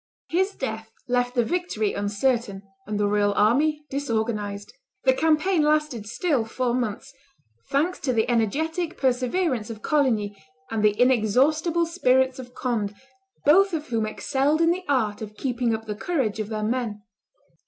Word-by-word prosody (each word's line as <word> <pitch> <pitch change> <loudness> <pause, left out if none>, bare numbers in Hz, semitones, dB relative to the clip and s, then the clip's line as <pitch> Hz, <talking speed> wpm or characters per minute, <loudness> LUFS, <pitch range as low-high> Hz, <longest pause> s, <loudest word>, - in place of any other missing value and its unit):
His 380 +4 +1
death 220 -4 -4 0.2
left 245 0 0
the 240 -2 +2
victory 345 - -1
uncertain 205 0 -1 0.2
and 210 -1 -2
the 205 - +2
royal 205 0 +2
army 295 +8 +2
disorganized. 220 -6 -2 0.3
The 260 - +5
campaign 320 +5 +2
lasted 300 -8 +1
still 250 - 0
four 240 +2 -2
months, 245 +2 -3 0.6
thanks 320 +6 +1
to 270 - -1
the 225 -2 +1
energetic 315 - 0
perseverance 255 -1 0
of 220 -2 -8
Coligny 220 - 0 0.3
and 220 -1 -1
the 210 0 +3
inexhaustible 265 - +3
spirits 260 -6 +2
of 250 -1 -10
Conde, 215 -5 -2 0.5
both 385 +6 +5
of 305 -2 -3
whom 225 -2 0
excelled 280 +6 0
in 330 0 +4
the 365 +1 -3
art 220 -7 +1
of 210 -1 -8
keeping 245 -3 0
up 220 0 -8
the 215 - -3
courage 220 -3 -1
of 215 -1 -3
their 215 -1 -3
men. 220 -2 -2
245 Hz, 155 wpm, -25 LUFS, 215-300 Hz, 0.6 s, The